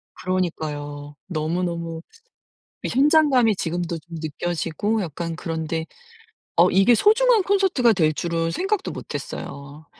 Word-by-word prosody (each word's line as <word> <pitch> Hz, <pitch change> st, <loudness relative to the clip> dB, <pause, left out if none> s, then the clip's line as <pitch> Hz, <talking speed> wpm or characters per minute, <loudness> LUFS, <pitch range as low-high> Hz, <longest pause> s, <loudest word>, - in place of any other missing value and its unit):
그러니까요. 145 Hz, -5 st, -3 dB
너무너무 170 Hz, 0 st, -2 dB, 0.8 s
이 -, -, -1 dB
현장감이 270 Hz, -5 st, +4 dB
지금도 170 Hz, -1 st, -2 dB
좀 165 Hz, +2 st, -10 dB
느껴지고 175 Hz, +7 st, -2 dB
약간 165 Hz, -1 st, -4 dB
그런데 160 Hz, 0 st, -3 dB, 0.7 s
어 -, -, +6 dB
이게 210 Hz, +5 st, +5 dB
소중한 445 Hz, -, +4 dB
콘서트가 375 Hz, -, +3 dB
될 160 Hz, -5 st, +2 dB
줄은 165 Hz, +1 st, -1 dB
생각도 385 Hz, -, -1 dB
못했어요. 140 Hz, +2 st, -7 dB
170 Hz, 280 characters per minute, -23 LUFS, 160-240 Hz, 0.8 s, 어